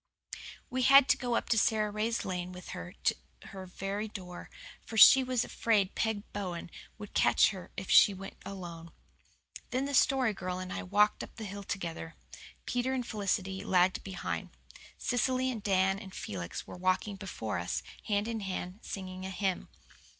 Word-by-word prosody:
We 255 +1 0
had 275 +1 +8
to - - +6
go 245 -2 -1
up 230 - +1
Sara 215 -1 +2
Ray's 220 +2 -1
lane 180 -1 -3
with 180 -1 -10
her 85 +1 -7
to - - +3 0.3
her 190 -1 -8
very 195 +3 -4
door, 180 -4 -8 0.3
for 225 - -7
she 265 +5 +10
was 255 -2 0
afraid 205 -5 +1
Peg 220 -2 -1
Bowen 180 -4 -4 0.3
would 210 -2 -9
catch - - +5
her 190 -3 -9
if 190 - -4
she - - +8
went 195 0 -8
alone. 170 -4 -8 0.8
Then 260 +2 0
the 285 - -4
Story 260 -4 +4
Girl 185 -2 -4
and 185 0 -5
I - - -3
walked 210 +3 +2
up - - -11
the 220 - -6
hill 200 0 -6
together. 170 -4 -5 0.5
Peter 245 +1 0
and 250 -2 -2
Felicity 195 -3 -2
lagged 185 0 +2
behind. 195 -1 -4 0.5
Cecily 255 +1 +1
and 225 -4 -5
Dan 190 -1 +2
and 190 -2 -10
Felix 90 -3 -5
were - - -9
walking 185 +3 0
before 180 - -4
us, 85 - -2 0.2
hand 205 0 +1
in 230 -1 -2
hand, 190 -1 -4
singing 185 -1 -6
a 190 - -4
hymn. 190 -1 -2
195 Hz, 170 wpm, -31 LUFS, 185-220 Hz, 0.8 s, she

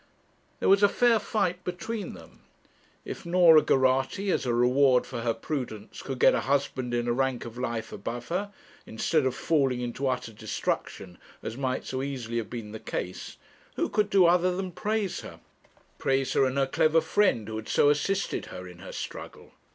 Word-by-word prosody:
There - - 0
was 195 +1 +6
a 205 - +6
fair 235 0 +3
fight 185 -4 -1
between 200 +4 -4
them. - - -15 0.7
If - - -6
Norah 170 -3 +6
Geraghty, 135 +10 +2
as 130 - 0
a 120 - +1
reward 125 +1 +4
for 120 -3 -5
her 115 -1 0
prudence, 115 -5 -5
could 135 -2 -5
get - - +5
a - - +1
husband 135 -2 -1
in 120 0 -1
a 120 - +2
rank 130 -1 -1
of 115 -1 -8
life 120 -2 -3
above 120 +4 -6
her, 200 +4 -2 0.4
instead 135 +5 +1
of 130 - -2
falling 135 -6 +1
into 125 +3 -3
utter 125 -3 -2
destruction 95 -3 -4 0.2
as - - -5
might 130 -1 -2
so 130 0 -3
easily 125 -4 -4
have 115 - -3
been 115 -3 -6
the 110 - -7
case, 90 -3 -5 0.4
who - - 0
could 210 -1 +1
do 195 -3 +5
other 180 +1 +3
than 190 -1 -3
praise 210 +1 -2
her - - -10 0.6
praise 135 0 +1
her 135 - +4
and 130 +1 -1
her 135 - +3
clever 155 +4 +3
friend 160 - +1
who 110 0 -4
had 110 - -7
so 145 - +4
assisted 195 +7 -1
her 90 0 -8
in 90 -1 -12
her - - -9
struggle? - - -8
135 Hz, 190 wpm, -27 LUFS, 120-180 Hz, 0.7 s, was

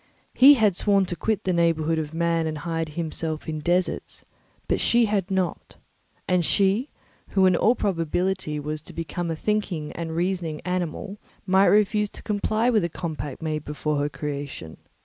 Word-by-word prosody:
He 280 +3 +8
had 215 -7 +3
sworn 200 0 +3
to 175 - -3
quit 220 +2 -1
the 185 - 0
neighbourhood 165 -1 +2
of 150 -1 -4
man 165 0 0
and 155 -1 -3
hide 165 0 -3
himself 160 0 -4
in 155 -1 -3
deserts, 175 +4 -1 0.4
but - - +1
she 235 0 +4
had 205 -3 -1
not; 190 -2 -2 0.5
and 180 -1 +2
she, 200 - +2 0.4
who 190 -1 +3
in 185 -1 +5
all 230 +7 +3
probability 175 -3 -1
was 150 +1 -4
to - - -12
become 170 +1 -4
a 165 - -1
thinking 185 -5 -2
and 165 -1 -5
reasoning 170 -3 -1
animal, 180 +3 -3 0.3
might 190 +1 +4
refuse 210 0 +3
to - - -12
comply 215 +2 0
with 220 -6 +3
a 170 - -1
compact 155 -4 -5
made 155 -2 -2
before 150 0 -2
her 145 +1 0
creation. 140 - -6
170 Hz, 170 wpm, -24 LUFS, 155-195 Hz, 0.5 s, He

